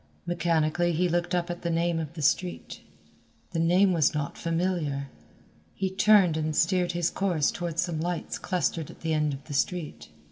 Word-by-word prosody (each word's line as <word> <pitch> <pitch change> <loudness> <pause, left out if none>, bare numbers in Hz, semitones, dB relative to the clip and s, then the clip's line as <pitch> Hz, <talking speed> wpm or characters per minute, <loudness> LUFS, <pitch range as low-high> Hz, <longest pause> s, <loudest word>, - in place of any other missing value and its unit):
Mechanically 170 -1 +1
he 180 +3 +2
looked 175 +1 0
up 175 0 -1
at 175 - -6
the 170 - -2
name 170 0 +1
of 155 -1 -5
the 155 - -5
street. 175 +5 -1 0.7
The 165 - -2
name 180 +3 +4
was 155 -3 +2
not 145 -1 -2
familiar. 165 -5 -1 0.7
He 190 -1 -2
turned 195 -4 +4
and 155 -1 -1
steered 180 +1 +2
his 175 -1 0
course 175 -7 +1
toward 170 -2 -5
some 170 -3 0
lights 175 0 -3
clustered 165 -3 -1
at - - -13
the 160 -1 -1
end 150 -1 +1
of 135 0 -7
the 150 - -8
street. 165 +3 -2
170 Hz, 180 wpm, -27 LUFS, 155-180 Hz, 0.7 s, name